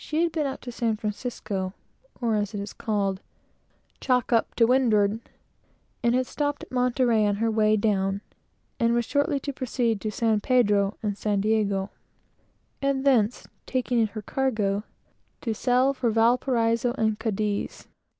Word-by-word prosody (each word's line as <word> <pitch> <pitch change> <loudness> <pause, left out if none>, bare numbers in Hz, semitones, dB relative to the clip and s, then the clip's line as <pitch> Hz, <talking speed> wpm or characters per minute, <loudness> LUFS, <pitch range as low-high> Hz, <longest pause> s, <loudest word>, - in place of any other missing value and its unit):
She 310 +2 0
had 340 - +1
been 310 -3 -1
up 270 - -5
to 245 - -7
San 230 -2 -1
Francisco, 210 -3 -4 0.4
or, 235 -2 0
as 210 0 -1
it - - -3
is 200 +1 -6
called, 200 -3 -1 0.8
"chock 250 -2 +1
up 230 - +1
to 230 - +5
windward," 225 -4 +3 0.8
had 245 +2 +2
stopped 290 +2 -2
at - - -12
Monterey 250 -3 +2
on 205 - +1
her 225 +2 0
way 215 0 +3
down, 200 -2 0 0.6
and 235 -1 +3
was 240 -1 +1
shortly 285 +2 +1
to 280 - -4
proceed 240 -5 -1
to 215 - -2
San 220 0 +1
Pedro 205 -5 +2
and 205 -1 -2
San 205 -2 0
Diego, 200 -2 0 0.9
and 275 -1 0
thence, 245 -4 +2 0.2
taking 250 -2 0
in 225 - +3
her 215 0 -8
cargo, 215 -6 0 0.6
to 225 - -1
sail 250 +4 +2
for 255 -3 0
Valparaiso 235 +1 +2
and 220 -3 0
Cadiz. 210 -1 -2
225 Hz, 155 wpm, -26 LUFS, 210-250 Hz, 0.9 s, to